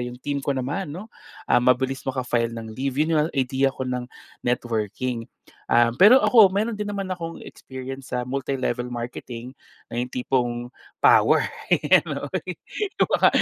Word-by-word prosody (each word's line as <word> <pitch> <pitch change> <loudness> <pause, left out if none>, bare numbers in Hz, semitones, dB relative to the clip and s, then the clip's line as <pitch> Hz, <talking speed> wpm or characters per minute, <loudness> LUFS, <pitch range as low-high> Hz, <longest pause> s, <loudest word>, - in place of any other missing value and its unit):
yung 120 0 -5
team 145 -1 -2
ko 140 +1 -1
naman 145 +8 -2
'no, 205 +6 -9 0.4
ah, - - +6
mabilis 130 +2 +2
maka-file 125 -3 -1
ng 115 -1 -7
leave. 130 +3 -3
Yun 160 +2 0
yung 150 - +3
idea 135 +1 +2
ko 130 - -4
ng 125 -1 -3 0.4
networking. 115 0 -2 0.4
Um, 120 0 +3
pero 225 +7 +8
ako 210 -6 +6
meron 215 +2 -1
din 210 - -3
naman 200 -2 -4
akong 165 -2 -5
experience 130 0 -8
sa 125 - 0
multi-level 130 -1 -2
marketing 120 0 -6 0.4
na 120 - -4
yung 125 - 0
tipong 125 -1 0 0.5
power, - - +6 1.5
kumbaga - - +3
130 Hz, 145 wpm, -24 LUFS, 120-145 Hz, 1.5 s, pero